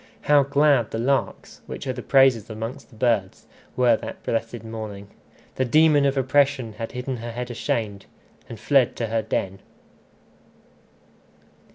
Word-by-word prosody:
How 145 Hz, -1 st, +4 dB
glad 140 Hz, -4 st, +3 dB
the -, -, -4 dB
larks, 135 Hz, +4 st, -2 dB
which -, -, -7 dB
are 130 Hz, -, -2 dB
the 125 Hz, -, -7 dB
praisers 130 Hz, -6 st, +3 dB
amongst 115 Hz, +5 st, -7 dB
the 120 Hz, -, -18 dB
birds, 110 Hz, -5 st, 0 dB, 0.3 s
were 125 Hz, -2 st, +4 dB
that -, -, -9 dB
blessed 115 Hz, 0 st, -3 dB
morning! 110 Hz, -3 st, -7 dB, 0.5 s
The 130 Hz, -, +2 dB
demon 150 Hz, +2 st, +4 dB
of 135 Hz, 0 st, -1 dB
oppression 135 Hz, -3 st, +1 dB
had 115 Hz, +2 st, -5 dB
hidden 125 Hz, 0 st, -4 dB
her 115 Hz, 0 st, -7 dB
head 125 Hz, +1 st, -5 dB
ashamed, 110 Hz, -4 st, -3 dB, 0.4 s
and 115 Hz, -, -8 dB
fled 130 Hz, +2 st, +2 dB
to 115 Hz, -, -2 dB
her 115 Hz, 0 st, 0 dB
den! 100 Hz, -3 st, -3 dB
120 Hz, 150 wpm, -23 LUFS, 115-135 Hz, 0.5 s, How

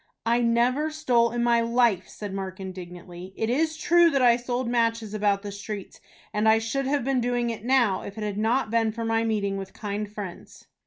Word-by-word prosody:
"I 235 Hz, +1 st, +2 dB
never 240 Hz, +6 st, +2 dB
stole 255 Hz, -7 st, +2 dB
in 240 Hz, 0 st, -2 dB
my 235 Hz, -1 st, +3 dB
life," 230 Hz, -5 st, +2 dB
said 205 Hz, -2 st, -7 dB
Mark, 190 Hz, -1 st, -5 dB
indignantly. 180 Hz, -1 st, -9 dB
"It 220 Hz, +1 st, 0 dB
is 315 Hz, +4 st, 0 dB
true 345 Hz, +1 st, +5 dB
that 275 Hz, -4 st, +1 dB
I 240 Hz, -1 st, +6 dB
sold 245 Hz, +1 st, -3 dB
matches 230 Hz, -2 st, 0 dB
about 205 Hz, -1 st, +1 dB
the 205 Hz, -, -5 dB
streets, 200 Hz, 0 st, -7 dB, 0.3 s
and 215 Hz, +1 st, +2 dB
I 220 Hz, -, +6 dB
should 245 Hz, +5 st, -2 dB
have 280 Hz, -1 st, 0 dB
been 265 Hz, -1 st, +1 dB
doing 240 Hz, -1 st, 0 dB
it 220 Hz, -2 st, -7 dB
now, 240 Hz, -6 st, +2 dB
if 200 Hz, -, -9 dB
it 215 Hz, -, -4 dB
had 205 Hz, -1 st, -3 dB
not 225 Hz, +1 st, +1 dB
been 225 Hz, -1 st, +2 dB
for 230 Hz, +1 st, -5 dB
my 225 Hz, 0 st, +1 dB
meeting 205 Hz, -3 st, -1 dB
with 195 Hz, -1 st, -7 dB
kind 210 Hz, -1 st, -4 dB
friends." 200 Hz, -4 st, -9 dB
230 Hz, 210 wpm, -26 LUFS, 205-245 Hz, 0.3 s, I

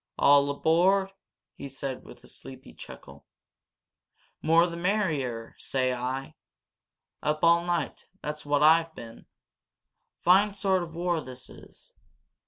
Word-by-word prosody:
"All 140 Hz, 0 st, +5 dB
aboard!" 180 Hz, +7 st, +2 dB, 0.4 s
he 140 Hz, -, -9 dB
said, 135 Hz, -1 st, -5 dB
with -, -, -15 dB
a -, -, -15 dB
sleepy -, -, -11 dB
chuckle. -, -, -13 dB, 1.1 s
"More 165 Hz, +2 st, +4 dB
the 170 Hz, -1 st, -5 dB
merrier, 160 Hz, -, -1 dB
say 130 Hz, -1 st, 0 dB
I! 130 Hz, +2 st, -4 dB, 0.9 s
Up 150 Hz, +1 st, -1 dB
all 170 Hz, 0 st, +5 dB
night 175 Hz, -1 st, -3 dB
that's 150 Hz, 0 st, -6 dB
what 145 Hz, 0 st, +1 dB
I've 160 Hz, +1 st, +4 dB
been! 115 Hz, 0 st, -11 dB, 0.9 s
Fine 195 Hz, +3 st, +4 dB
sort 190 Hz, -2 st, +1 dB
of 165 Hz, -2 st, -7 dB
war 170 Hz, -1 st, -1 dB
this 130 Hz, -2 st, -10 dB
is? -, -, -17 dB
160 Hz, 125 wpm, -27 LUFS, 135-175 Hz, 1.1 s, All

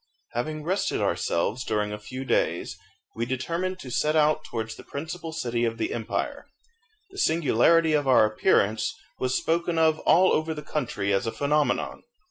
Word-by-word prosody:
Having 155 Hz, +6 st, -3 dB
rested 185 Hz, +5 st, 0 dB
ourselves 110 Hz, +9 st, 0 dB
during 105 Hz, -2 st, -1 dB
a 105 Hz, -, -6 dB
few 130 Hz, +5 st, -7 dB
days, -, -, 0 dB, 0.4 s
we 115 Hz, -, -2 dB
determined 165 Hz, +10 st, -2 dB
to 130 Hz, -8 st, -9 dB
set 150 Hz, +6 st, +1 dB
out 155 Hz, 0 st, +3 dB
towards 110 Hz, -4 st, -4 dB
the -, -, -12 dB
principal 160 Hz, +3 st, -6 dB
city 120 Hz, -6 st, -2 dB
of 115 Hz, -1 st, 0 dB
the 115 Hz, -, -2 dB
empire. 115 Hz, -2 st, -3 dB, 0.6 s
The 390 Hz, -, -8 dB
singularity 160 Hz, -, +3 dB
of 145 Hz, -2 st, +1 dB
our 125 Hz, -4 st, +6 dB
appearance 110 Hz, -, +1 dB, 0.2 s
was 130 Hz, 0 st, +1 dB
spoken 170 Hz, +1 st, 0 dB
of 160 Hz, -1 st, +3 dB
all 185 Hz, +3 st, +4 dB
over 160 Hz, 0 st, 0 dB
the 150 Hz, -, -7 dB
country 120 Hz, -10 st, -2 dB
as 100 Hz, +4 st, 0 dB
a -, -, 0 dB
phenomenon. 145 Hz, +2 st, 0 dB
140 Hz, 165 wpm, -26 LUFS, 115-160 Hz, 0.6 s, our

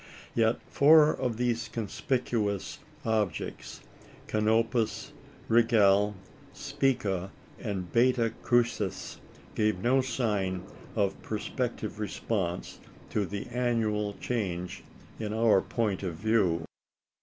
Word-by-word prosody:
Yet 115 Hz, 0 st, +3 dB
four 150 Hz, +1 st, +6 dB
of 120 Hz, -3 st, -2 dB
these 120 Hz, -1 st, 0 dB
conspicuous 110 Hz, -3 st, -2 dB, 0.3 s
objects 105 Hz, -7 st, -2 dB, 0.4 s
Canopus, 110 Hz, +1 st, +1 dB, 0.3 s
Rigel, 105 Hz, -3 st, +4 dB, 0.4 s
Spica, 100 Hz, -8 st, -1 dB, 0.3 s
and 95 Hz, -4 st, -4 dB
Beta 120 Hz, -1 st, +3 dB
Crucis 120 Hz, -5 st, 0 dB, 0.3 s
gave 105 Hz, -2 st, +1 dB
no 125 Hz, +7 st, +3 dB
sign 105 Hz, -8 st, -1 dB, 0.3 s
of 100 Hz, -3 st, 0 dB
perspective 110 Hz, 0 st, -3 dB
response 100 Hz, -4 st, -3 dB, 0.3 s
to 105 Hz, -3 st, 0 dB
the 100 Hz, +1 st, -5 dB
annual 110 Hz, -4 st, 0 dB
change 90 Hz, -6 st, -3 dB, 0.4 s
in 105 Hz, -1 st, -3 dB
our 110 Hz, -4 st, +4 dB
point 105 Hz, -5 st, -1 dB
of 90 Hz, -4 st, -3 dB
view. 95 Hz, -4 st, +1 dB
110 Hz, 95 wpm, -29 LUFS, 100-120 Hz, 0.4 s, four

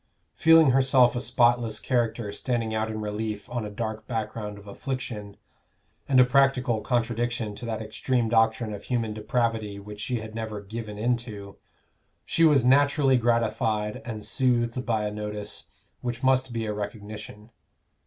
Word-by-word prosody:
Feeling 160 Hz, -3 st, +6 dB
herself 130 Hz, -1 st, +4 dB
a 120 Hz, -, -1 dB
spotless 120 Hz, -4 st, +2 dB
character 115 Hz, -4 st, -1 dB
standing 115 Hz, +1 st, -2 dB
out 110 Hz, 0 st, -1 dB
in 110 Hz, -1 st, -4 dB
relief 105 Hz, 0 st, -4 dB
on 120 Hz, -2 st, -2 dB
a 105 Hz, -, -5 dB
dark 110 Hz, +1 st, -5 dB
background 110 Hz, -2 st, -4 dB
of 100 Hz, -, -13 dB
affliction, 105 Hz, -2 st, -5 dB, 0.7 s
and 130 Hz, -2 st, +5 dB
a -, -, +9 dB
practical 125 Hz, -3 st, +2 dB
contradiction 120 Hz, -1 st, -1 dB
to 120 Hz, -, -8 dB
that 110 Hz, -1 st, -3 dB
extreme 120 Hz, +2 st, -1 dB
doctrine 110 Hz, 0 st, +2 dB
of 100 Hz, 0 st, -8 dB
human 115 Hz, -4 st, -1 dB
depravity 110 Hz, -1 st, -1 dB
which 105 Hz, +1 st, -9 dB
she 120 Hz, +2 st, -2 dB
had 110 Hz, 0 st, -8 dB
never 110 Hz, -2 st, -4 dB
"given 105 Hz, +1 st, -7 dB
in 120 Hz, +3 st, +1 dB
to," 105 Hz, -4 st, -9 dB, 0.7 s
she 165 Hz, -, +1 dB
was 145 Hz, -6 st, +5 dB
naturally 140 Hz, +1 st, +4 dB
gratified 110 Hz, -3 st, 0 dB
and 110 Hz, -3 st, -6 dB
soothed 125 Hz, -1 st, +1 dB
by 110 Hz, -2 st, +1 dB
a 105 Hz, -, -2 dB
notice 105 Hz, 0 st, -6 dB, 0.4 s
which 120 Hz, +1 st, -4 dB
must 130 Hz, -1 st, +3 dB
be 115 Hz, -1 st, -2 dB
a 105 Hz, -, -2 dB
recognition. 105 Hz, +1 st, -7 dB
115 Hz, 155 wpm, -26 LUFS, 105-125 Hz, 0.7 s, a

